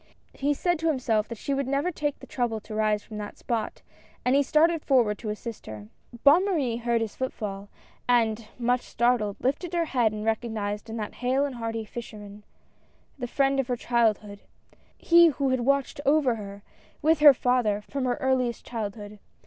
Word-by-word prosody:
He 285 Hz, +1 st, 0 dB
said 350 Hz, +2 st, 0 dB
to 325 Hz, -, -1 dB
himself 245 Hz, -8 st, +1 dB
that 230 Hz, -, -7 dB
she 280 Hz, -, -3 dB
would 275 Hz, -1 st, -1 dB
never 280 Hz, +6 st, 0 dB
take 295 Hz, -3 st, -2 dB
the -, -, -12 dB
trouble 240 Hz, -3 st, -2 dB
to 215 Hz, -, -10 dB
rise 215 Hz, -1 st, +1 dB
from 215 Hz, -1 st, -8 dB
that 205 Hz, 0 st, -7 dB
spot, 225 Hz, -3 st, -3 dB, 0.4 s
and 250 Hz, -, +3 dB
he 280 Hz, -, +5 dB
started 315 Hz, +3 st, +3 dB
forward 240 Hz, -8 st, +2 dB
to 220 Hz, -, -5 dB
assist 215 Hz, +2 st, -6 dB
her. 105 Hz, -1 st, -9 dB, 0.3 s
Bonne 295 Hz, +6 st, +7 dB
Marie 290 Hz, -12 st, 0 dB
heard 235 Hz, -1 st, 0 dB
his 225 Hz, -2 st, -4 dB
footfall, 205 Hz, -6 st, -5 dB, 0.4 s
and, 225 Hz, -2 st, +2 dB
much 245 Hz, +1 st, +1 dB
startled, 235 Hz, -4 st, 0 dB
lifted 295 Hz, +7 st, -2 dB
her 340 Hz, -1 st, +1 dB
head 245 Hz, -7 st, +1 dB
and 215 Hz, 0 st, -5 dB
recognized 220 Hz, -2 st, -2 dB
in 225 Hz, -, -5 dB
that 210 Hz, -2 st, -5 dB
hale 260 Hz, +3 st, +2 dB
and 280 Hz, -, -4 dB
hearty 225 Hz, -1 st, -4 dB
fisherman, 210 Hz, -2 st, -9 dB, 0.8 s
the 245 Hz, -, -3 dB
friend 275 Hz, +2 st, +1 dB
of 265 Hz, -, 0 dB
her 245 Hz, -2 st, -1 dB
childhood, 220 Hz, -4 st, 0 dB, 0.6 s
he 340 Hz, 0 st, +6 dB
who 280 Hz, -3 st, 0 dB
had 260 Hz, 0 st, +1 dB
watched 275 Hz, +3 st, 0 dB
over 280 Hz, -3 st, +3 dB
her, 200 Hz, -2 st, -8 dB, 0.4 s
with 315 Hz, +1 st, +4 dB
her 295 Hz, -2 st, +9 dB
father, 245 Hz, -5 st, +1 dB
from 275 Hz, -2 st, -3 dB
her 245 Hz, -1 st, +1 dB
earliest 260 Hz, -4 st, -1 dB
childhood. 210 Hz, -2 st, -6 dB
240 Hz, 185 wpm, -26 LUFS, 215-275 Hz, 0.8 s, her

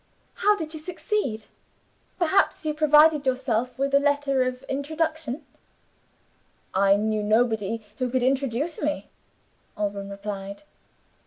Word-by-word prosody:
"How 420 Hz, 0 st, +5 dB
did 320 Hz, -4 st, -5 dB
you 315 Hz, -, -6 dB
succeed? 305 Hz, -, -3 dB, 0.7 s
Perhaps 365 Hz, -1 st, +2 dB
you 305 Hz, -, 0 dB
provided 300 Hz, -1 st, +5 dB
yourself 255 Hz, -1 st, 0 dB
with 275 Hz, +1 st, -1 dB
a 280 Hz, -, +7 dB
letter 285 Hz, -2 st, +1 dB
of 255 Hz, 0 st, -2 dB
introduction?" 310 Hz, 0 st, -2 dB, 1.3 s
"I 195 Hz, +1 st, +4 dB
knew 215 Hz, 0 st, 0 dB
nobody 220 Hz, 0 st, +1 dB
who 255 Hz, -1 st, 0 dB
could 255 Hz, 0 st, 0 dB
introduce 270 Hz, +4 st, 0 dB
me," 300 Hz, 0 st, -2 dB, 0.7 s
Alban 200 Hz, -1 st, -3 dB
replied. 200 Hz, +1 st, -6 dB
265 Hz, 115 wpm, -25 LUFS, 220-305 Hz, 1.3 s, a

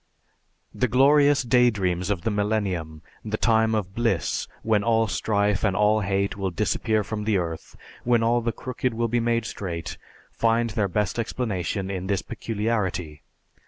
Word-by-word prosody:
The 125 Hz, -, +1 dB
glorious 140 Hz, +4 st, +4 dB
daydreams 105 Hz, -7 st, +2 dB
of 95 Hz, -4 st, -1 dB
the 110 Hz, -, 0 dB
millennium, 100 Hz, -7 st, -2 dB, 0.2 s
the 110 Hz, 0 st, -3 dB
time 110 Hz, -1 st, +3 dB
of 95 Hz, -3 st, -3 dB
bliss 115 Hz, -8 st, 0 dB, 0.2 s
when 110 Hz, -2 st, +2 dB
all 115 Hz, 0 st, +3 dB
strife 105 Hz, -1 st, 0 dB
and 100 Hz, -4 st, +2 dB
all 105 Hz, +2 st, +3 dB
hate 100 Hz, 0 st, -1 dB
will 95 Hz, -1 st, -2 dB
disappear 105 Hz, +4 st, 0 dB
from 105 Hz, +1 st, -4 dB
the 105 Hz, -2 st, +1 dB
earth, 85 Hz, -3 st, -5 dB, 0.3 s
when 120 Hz, -1 st, +2 dB
all 120 Hz, +1 st, +2 dB
the 115 Hz, 0 st, -1 dB
crooked 125 Hz, 0 st, -3 dB
will 115 Hz, +1 st, 0 dB
be 120 Hz, +2 st, +1 dB
made 115 Hz, 0 st, 0 dB
straight, 85 Hz, -7 st, -5 dB, 0.3 s
find 115 Hz, 0 st, +1 dB
their 105 Hz, -2 st, 0 dB
best 105 Hz, +4 st, -1 dB
explanation 100 Hz, -5 st, -2 dB
in 95 Hz, -1 st, -4 dB
this 100 Hz, -1 st, 0 dB
peculiarity. 105 Hz, -8 st, -3 dB
105 Hz, 160 wpm, -25 LUFS, 95-115 Hz, 0.3 s, glorious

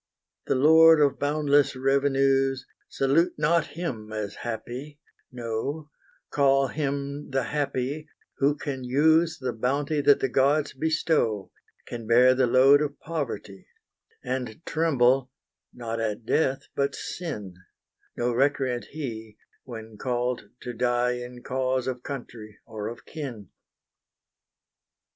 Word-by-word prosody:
The -, -, +2 dB
lord 160 Hz, +3 st, +7 dB
of 145 Hz, -2 st, +2 dB
boundless 145 Hz, -1 st, +2 dB
revenues, 135 Hz, 0 st, +2 dB, 0.2 s
Salute 155 Hz, +6 st, +2 dB
not 155 Hz, +2 st, +2 dB
him 120 Hz, -11 st, -5 dB
as 105 Hz, -2 st, -4 dB
happy: 125 Hz, +5 st, -6 dB, 0.3 s
no, 125 Hz, +6 st, -4 dB, 0.4 s
Call 135 Hz, -1 st, +3 dB
him 140 Hz, -1 st, -3 dB
the 135 Hz, -1 st, 0 dB
happy, 140 Hz, +2 st, -2 dB, 0.3 s
who 140 Hz, +1 st, +3 dB
can 135 Hz, -4 st, -5 dB
use 160 Hz, +6 st, +3 dB
The 130 Hz, -2 st, -3 dB
bounty 140 Hz, +6 st, 0 dB
that 145 Hz, 0 st, +5 dB
the -, -, +1 dB
gods 140 Hz, +3 st, +2 dB
bestow, 155 Hz, -8 st, 0 dB, 0.3 s
Can 115 Hz, -2 st, -7 dB
bear 125 Hz, +2 st, +6 dB
the 130 Hz, -1 st, +2 dB
load 135 Hz, +4 st, +6 dB
of 145 Hz, -1 st, -3 dB
poverty, 120 Hz, -12 st, -5 dB, 0.6 s
And 125 Hz, +2 st, -4 dB
tremble 135 Hz, -5 st, +2 dB, 0.4 s
not 115 Hz, -2 st, -5 dB
at 110 Hz, 0 st, -3 dB
death, 135 Hz, 0 st, +1 dB
but 140 Hz, 0 st, 0 dB
sin: 110 Hz, -, -6 dB, 0.6 s
No 120 Hz, +1 st, 0 dB
recreant 130 Hz, -1 st, +1 dB
he 115 Hz, -8 st, -7 dB, 0.3 s
when 110 Hz, -3 st, -9 dB
called 125 Hz, 0 st, -2 dB
to 125 Hz, -, -6 dB
die 120 Hz, +1 st, +1 dB
In 125 Hz, 0 st, -9 dB
cause 130 Hz, 0 st, -1 dB
of 125 Hz, -2 st, -3 dB
country 115 Hz, -6 st, -8 dB
or 110 Hz, -2 st, -6 dB
of 120 Hz, -, -8 dB
kin. 130 Hz, -10 st, -7 dB
135 Hz, 120 wpm, -26 LUFS, 120-145 Hz, 0.6 s, lord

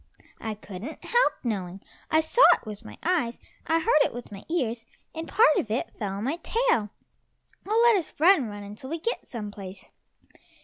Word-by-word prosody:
"I 220 Hz, -1 st, -4 dB
couldn't 205 Hz, +7 st, -9 dB
help 485 Hz, +1 st, +3 dB
knowing! 195 Hz, -6 st, -3 dB, 0.3 s
I 315 Hz, -, +4 dB
saw 320 Hz, +10 st, +1 dB
it -, -, -14 dB
with 210 Hz, +1 st, -8 dB
my 215 Hz, -, -11 dB
eyes, 320 Hz, -10 st, 0 dB, 0.3 s
I 325 Hz, +1 st, +3 dB
heard 305 Hz, -1 st, +4 dB
it -, -, -2 dB
with 245 Hz, -3 st, -8 dB
my 200 Hz, -1 st, -9 dB
ears, 240 Hz, -9 st, -1 dB, 0.3 s
and 325 Hz, 0 st, -6 dB
a -, -, -11 dB
part 425 Hz, -8 st, +5 dB
of 220 Hz, -, -1 dB
it 240 Hz, +10 st, -2 dB
fell 200 Hz, -4 st, -2 dB
on 200 Hz, +2 st, -4 dB
my 280 Hz, +7 st, -1 dB
tail. 445 Hz, -, +1 dB, 0.8 s
Oh, 440 Hz, +3 st, +3 dB
let 470 Hz, -2 st, +6 dB
us 360 Hz, -6 st, -3 dB
run, 325 Hz, -6 st, +5 dB
run 205 Hz, 0 st, -8 dB
until 210 Hz, +6 st, -9 dB
we 330 Hz, -, -2 dB
get 460 Hz, +9 st, -3 dB
some 210 Hz, -4 st, -6 dB
place." 190 Hz, -2 st, -10 dB
245 Hz, 195 wpm, -26 LUFS, 210-330 Hz, 0.8 s, let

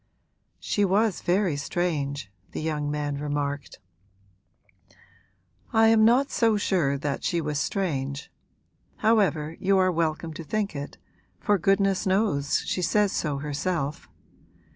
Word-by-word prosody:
'She 205 Hz, -, 0 dB
was 200 Hz, +1 st, +2 dB
very 180 Hz, -2 st, +1 dB
strange,' 145 Hz, -, -2 dB, 0.2 s
the -, -, -3 dB
young 150 Hz, -2 st, -2 dB
man 145 Hz, -1 st, -2 dB
remarked. 145 Hz, -1 st, -3 dB, 2.0 s
'I 225 Hz, 0 st, +5 dB
am 225 Hz, -1 st, +5 dB
not 250 Hz, +5 st, +4 dB
so 225 Hz, -2 st, +3 dB
sure 170 Hz, -9 st, +1 dB
that 140 Hz, 0 st, -3 dB
she 170 Hz, -, 0 dB
was 150 Hz, -2 st, -2 dB
strange. 145 Hz, -4 st, -2 dB, 0.7 s
However, 180 Hz, -8 st, +2 dB
you 195 Hz, +1 st, +3 dB
are 185 Hz, -1 st, +3 dB
welcome 160 Hz, -1 st, -1 dB
to 165 Hz, -, -7 dB
think 205 Hz, +1 st, -2 dB
it, 140 Hz, 0 st, -6 dB, 0.4 s
for 205 Hz, -2 st, +2 dB
goodness 195 Hz, +2 st, +2 dB
knows 190 Hz, -8 st, +1 dB
she 185 Hz, -, -1 dB
says 205 Hz, +2 st, +2 dB
so 150 Hz, -6 st, -1 dB
herself. 150 Hz, +2 st, -3 dB
165 Hz, 125 wpm, -26 LUFS, 145-195 Hz, 2.0 s, I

